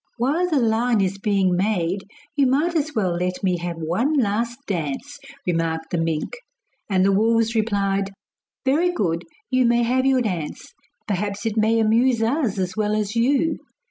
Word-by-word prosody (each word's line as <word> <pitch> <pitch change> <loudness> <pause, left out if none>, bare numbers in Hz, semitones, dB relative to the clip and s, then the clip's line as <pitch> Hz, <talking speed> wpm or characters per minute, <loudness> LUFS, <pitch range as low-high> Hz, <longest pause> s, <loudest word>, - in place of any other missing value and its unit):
'While 300 +9 +1
the 310 - +2
line 230 -1 +2
is 195 0 0
being 195 -3 +2
made 190 -1 0 0.3
you 280 -3 +3
might 305 +7 +1
as 310 -2 -1
well 195 -5 +1
let 180 +2 -2
me 180 -2 +1
have 175 0 -4
one 175 - 0
last 235 -2 0
dance,' 190 - -4 0.3
remarked 165 -2 -1
the 175 - 0
mink. 165 - -2 0.5
And 190 -1 +3
the 195 - +4
wolves 225 +3 +2
replied: 200 -3 0 0.6
'Very 320 +7 +3
good, 170 - -1 0.3
you 255 0 +3
may 235 0 +3
have 255 +3 +2
your 265 -1 +3
dance; 175 -8 -4 0.3
perhaps 205 +1 -2
it 220 -2 -1
may 220 +1 +3
amuse 230 +3 +3
us 240 -3 0
as 185 -1 -2
well 215 -1 0
as 210 0 -2
you. 275 +7 +2
215 Hz, 170 wpm, -22 LUFS, 185-250 Hz, 0.6 s, the